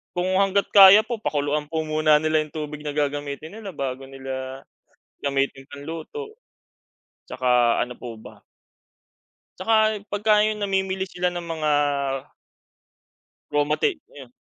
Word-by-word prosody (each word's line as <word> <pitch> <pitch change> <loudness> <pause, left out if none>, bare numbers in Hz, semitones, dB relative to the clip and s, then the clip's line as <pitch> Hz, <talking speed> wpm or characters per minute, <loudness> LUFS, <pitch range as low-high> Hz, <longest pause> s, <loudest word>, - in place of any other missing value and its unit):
kung 180 +1 0
hangga't 200 0 +2
kaya 200 +1 +9
po 235 0 -4
pakuluan 150 -4 -1
po 160 0 -2
muna 155 -1 +3
nila 155 0 +2
yung 155 -1 -8
tubig 150 -1 -5
na 145 - -3
gagamitin 145 +1 -3
nila 200 -5 -8
bago 135 -1 -4
nila 130 0 -6 0.6
gamitin 135 -1 -1
pang 145 0 -9
luto. 435 - -7 0.9
'Tsaka 125 -2 +2
ano 125 - -9
po 115 -3 -9
ba? - - -14 1.2
'Tsaka 215 +1 +2
pagka 210 +1 +3
yung 215 -1 -1
namimili 190 -1 -1
sila 180 0 -1
ng 175 - -4
mga 155 -2 -1 1.8
raw 145 - +3
mate 215 - 0
ayun, 135 -4 -13
155 Hz, 135 wpm, -23 LUFS, 140-195 Hz, 1.8 s, kaya